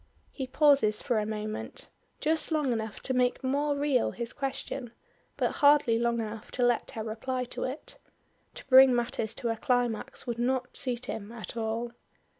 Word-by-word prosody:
He 265 -2 -5
pauses 275 -6 +4
for 235 -4 0
a 210 - -2
moment, 215 0 -5 0.3
just 315 +2 0
long 300 -5 +1
enough 220 -2 -4
to 260 - -2
make 250 +1 +1
more 285 +2 +1
real 280 -4 +2
his 235 -1 -5
question, 270 -3 -4 0.4
but - - 0
hardly 285 -6 +5
long 235 0 +1
enough 220 0 -5
to 250 - 0
let 240 -1 +1
her 220 - -2
reply 250 +4 -3
to - - -3
it. 260 +4 -7 0.6
To - - -9
bring 260 -1 +8
matters 230 -2 -1
to 240 -3 -2
a 225 - -1
climax, 245 -1 -1
would 235 -1 -3
not 250 +1 -1
suit 250 -1 -2
him 220 -3 -5
at 235 -1 -8
all. 230 +1 -2
245 Hz, 175 wpm, -29 LUFS, 225-265 Hz, 0.6 s, bring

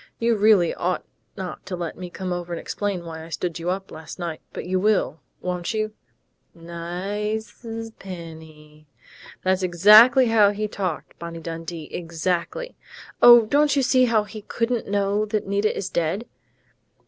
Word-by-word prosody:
You 235 0 +2
really 205 -5 +4
ought 180 +1 -2 0.3
not 185 -2 -6
to 185 - -3
let 175 -2 -5
me 180 -1 -7
come 185 +1 -4
over 175 0 -5
and 170 - -3
explain 200 -4 -3
why 160 -1 -7
I 165 - -11
stood 170 +1 -3
you 170 +2 -3
up 190 +1 -3
last 155 0 -9
night, 170 -3 -5
but - - -6
you 185 +1 0
will, 200 -5 +1 0.2
won't 180 +3 -3
you?... 215 0 -1 0.6
Ni 170 0 -12
i 195 +6 -3
ze 225 0 -8
Penny!...' 160 -4 -11 0.6
That's 185 0 +2
exactly 210 +9 +7
how 215 -3 +5
he 210 +1 -2
talked, 185 -6 -4
Bonnie 170 0 -6
Dundee! 165 -1 -6
Exactly! 175 - -3 0.5
_Oh, 240 -2 +9
don't 290 +3 +3
you 275 - +2
see 255 0 +4
he 215 -2 0
couldn't 230 +2 -2
know 200 +1 +1
that 210 0 -1
Nita 200 +2 0
is 195 -1 -4
dead? 170 +7 -1
185 Hz, 160 wpm, -23 LUFS, 170-215 Hz, 0.6 s, Oh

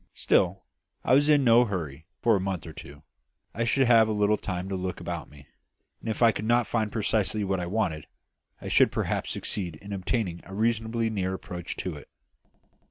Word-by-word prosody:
Still, 95 +2 +2 0.4
I - - +2
was 145 +3 +5
in 145 -2 +5
no 120 0 +6
hurry 80 - -5 0.2
for 115 -2 +5
a - - +1
month 95 -3 -3
or 80 - -9
two; 70 +1 -12 0.5
I 115 - -1
should 135 +3 +3
have 115 -2 +6
a - - -1
little 105 0 +3
time 90 -3 -4
to 95 - -2
look 90 0 -4
about 85 -2 -5
me; 70 -1 -16 0.5
and 115 - -6
if 110 +2 0
I 115 - +7
could 105 - -5
not 120 +1 +3
find 110 -3 -1
precisely 110 -1 0
what 95 -1 -1
I 90 - -3
wanted, 90 -6 -1 0.5
I - - -8
should - - +4
perhaps - - -2
succeed 90 -6 -2
in 100 +6 -9
obtaining 95 -2 -2
a 95 - -10
reasonably 115 +1 0
near 95 -3 -1
approach 90 -2 -6
to 90 -5 -4
it. 75 - -13
100 Hz, 200 wpm, -27 LUFS, 90-115 Hz, 0.5 s, I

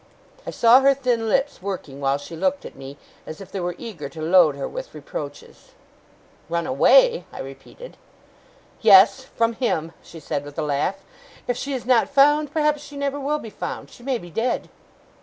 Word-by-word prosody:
I - - -2
saw 235 +2 +6
her 275 0 +4
thin 245 -4 -1
lips 270 -3 0
working 180 -8 -6
while 135 0 +1
she 145 +4 -10
looked 280 - -1
at - - -9
me, 135 +1 -10 0.3
as 155 - -8
if 195 -1 -11
they 195 - -4
were 175 -1 -3
eager 170 -12 -7
to 160 - -12
load 165 -3 +5
her 140 - -4
with - - -8
reproaches. 145 -1 -9 0.8
'Run 170 0 -1
away?' - - +4
I - - -10
repeated. 135 - -11 0.8
'Yes! 210 +4 +7
From 230 0 +1
him,' 165 -10 -1
she 165 - -12
said, 145 -1 -4
with 145 0 -11
a 160 - -1
laugh. 150 +7 -2 0.4
'If 245 - 0
she 280 +3 -4
is 250 - -6
not 245 -2 +3
found, 295 +1 +4
perhaps 300 -1 +1
she 290 -1 -11
never 280 0 -2
will 290 +2 -1
be 225 -7 -9
found. - - -6
She - - -16
may 260 0 -1
be 175 -5 -12
dead! 230 +8 -2
220 Hz, 190 wpm, -22 LUFS, -, 0.8 s, Yes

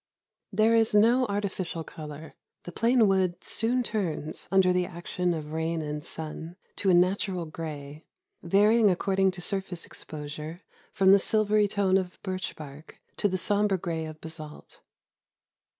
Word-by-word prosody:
There 220 +1 +3
is 225 -2 +3
no 235 +5 +5
artificial 195 -5 -3
color. 155 0 -9 0.3
The 175 - -8
plain 230 +3 +3
wood 185 -2 +1
soon 245 +3 0
turns, 170 -9 -3
imder 190 -1 +4
the 180 0 +1
action 175 +1 -2
of 150 -1 -6
rain 160 0 -1
and 150 0 -4
sun, 160 +1 -7 0.2
to 195 - +1
a - - +5
natural 185 0 +1
gray, 155 -2 -7 0.3
varying 210 +5 +4
according 190 +1 +2
to 180 - -5
surface 190 -2 -2
exposure 155 +3 -7 0.3
from 190 -1 +4
the 200 - +7
silvery 215 0 +3
tone 195 -2 +2
of 185 -1 -6
birch 185 -2 -4
bark 150 0 -11 0.2
to - - +2
the 185 -1 -1
somber 205 +1 +1
gray 165 -2 -3
of 155 0 -9
basalt. 155 -2 -10
180 Hz, 150 wpm, -27 LUFS, 160-200 Hz, 0.3 s, the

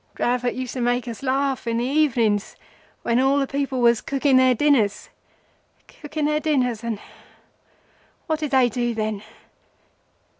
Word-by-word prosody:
Dravot 245 0 0
used 255 -1 -5
to 255 - -4
make 245 +1 0
us 230 -3 -6
laugh 270 -1 -1
in 230 0 0
the 240 - 0
evenings 240 -8 +1 0.5
when 235 +1 +1
all 270 +2 +3
the 280 - +1
people 275 -2 -2
was 235 -1 +4
cooking 275 -1 +2
their 255 -1 +4
dinners—cooking 290 +4 -3
their 300 0 +1
dinners, 255 -7 0
and… 230 -2 -2 1.3
what 315 -2 -1
did 305 -2 -2
they 260 -2 +4
do 240 0 -2
then? 215 -2 -2
255 Hz, 145 wpm, -23 LUFS, 235-280 Hz, 1.3 s, was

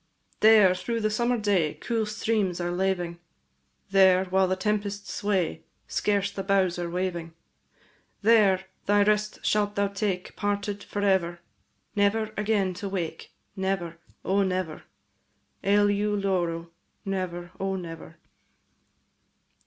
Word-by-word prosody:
There, 215 -4 +7
through 230 +5 -3
the 215 0 +1
summer 240 +3 +1
day, 200 -8 +1
Cool 225 -2 -2
streams 210 -4 -1
are 175 0 -1
laving; 175 -2 -1 0.7
There, 190 -1 +5
while 190 0 +2
the 185 - +1
tempests 205 +1 -2
sway, 195 -5 -1 0.3
Scarce 200 -1 0
are - - +1
boughs 190 -2 +1
waving; 175 -1 -3 0.9
There, 205 -4 +5 0.2
thy 205 0 +5
rest 210 0 0
shalt 205 -1 +1
thou 200 0 +1
take, 195 -2 -3
Parted 205 0 -2
for 205 - -4
ever; 175 -3 +1 0.5
Never 215 +2 +1
again 205 -3 +1
to 200 - -3
wake, 180 -4 -4 0.2
Never, 190 -4 -2 0.3
O 195 +1 +2
never! 185 -4 -2 0.8
Eleu 205 +1 +3
loro, 180 -4 0
&c. 170 - -20 0.4
Never, 180 -3 -3
O 195 0 -1
never! 165 -3 -8
195 Hz, 120 wpm, -27 LUFS, 180-205 Hz, 0.9 s, There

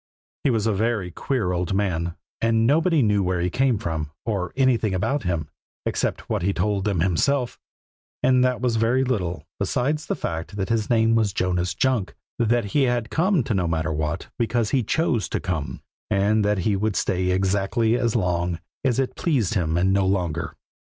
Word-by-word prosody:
He - - +3
was 115 -4 +1
a 110 - +2
very 105 -3 -1
queer 110 0 -1
old 90 +1 -1
man, 85 -4 -1 0.3
and 115 0 +3
nobody 160 +3 +3
knew 105 -2 +2
where 90 -1 0
he 90 +1 0
came 130 0 +2
from, 80 -5 -3 0.2
or 100 -6 -2
anything 120 -7 +2
about 115 +10 0
him, 85 -6 -2 0.4
except - - -2
what - - -1
he 100 +3 +1
told 100 +1 0
them 100 -6 0
himself; 120 - +1 0.6
and 130 0 +4
that 125 -1 +1
was 120 -3 +1
very 120 +4 +2
little 90 - -2
besides 130 +9 -1
the - - 0
fact 80 +4 -4
that 95 -2 -2
his 115 -2 0
name 115 -1 +3
was 110 -4 +2
Jonas 90 -1 0
Junk, 130 -7 0 0.2
that 120 0 +2
he 135 +7 +2
had 120 -2 -1
come 175 -2 +2
to 115 - -2
Nomatterwhat 80 -3 -1
because 115 -1 0
he 135 - +3
chose 115 - 0
to - - -1
come, 80 -6 -4 0.3
and 105 +1 +2
that 105 0 +2
he 100 +3 +1
would 105 0 -1
stay 90 0 0
exactly 100 +5 +1
as 120 -2 0
long 90 -4 0 0.2
as 130 -4 +1
it 135 -1 -1
pleased 135 - 0
him 85 -4 0
and 95 +2 +2
no 100 -1 +2
longer. 85 -4 -1
105 Hz, 185 wpm, -24 LUFS, 90-120 Hz, 0.6 s, and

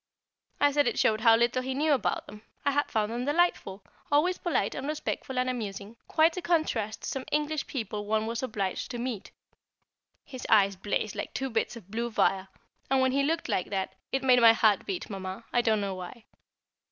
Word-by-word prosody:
I 290 - +4
said 290 0 +2
it - - -1
showed 215 0 +2
how 225 -1 +7
little 235 +2 +2
he 260 +1 -3
knew 300 +2 +2
about 270 - 0
them, 210 - -12 0.2
I 285 - +3
had 290 +1 0
found 215 -1 0
them 240 +1 -3
delightful, 290 - 0 0.3
always 335 +6 +3
polite 345 - 0
and 275 - -5
respectful 295 -3 -4
and 250 0 +1
amusing, 210 -3 -4
quite 320 +1 +3
a 365 - -3
contrast 310 -12 0
to - - -4
some 265 -1 -4
English 300 0 -1
people 210 -5 -4
one 215 0 +1
was 230 +1 -3
obliged 205 -7 -3
to 245 - -5
meet. 235 -5 -4 1.0
His 255 -2 -8
eyes 200 -3 +5
blazed 205 +2 -2
like - - -5
two 270 -1 -2
bits 225 +1 -1
of 200 -4 -13
blue 235 +2 -2
fire, 195 -3 +1 0.4
and 270 0 +3
when 260 0 +3
he 275 +2 +2
looked 325 +4 0
like 180 - -1
that, 195 -2 -2 0.2
it 270 0 -1
made 250 -2 +5
my 230 -1 +8
heart 215 -3 +2
beat, 380 -3 -3
Mamma, 195 +1 -6
I 245 - +4
don't 220 -2 +2
know 200 -1 -2
why. 185 +5 -9
235 Hz, 205 wpm, -28 LUFS, 210-280 Hz, 1.0 s, my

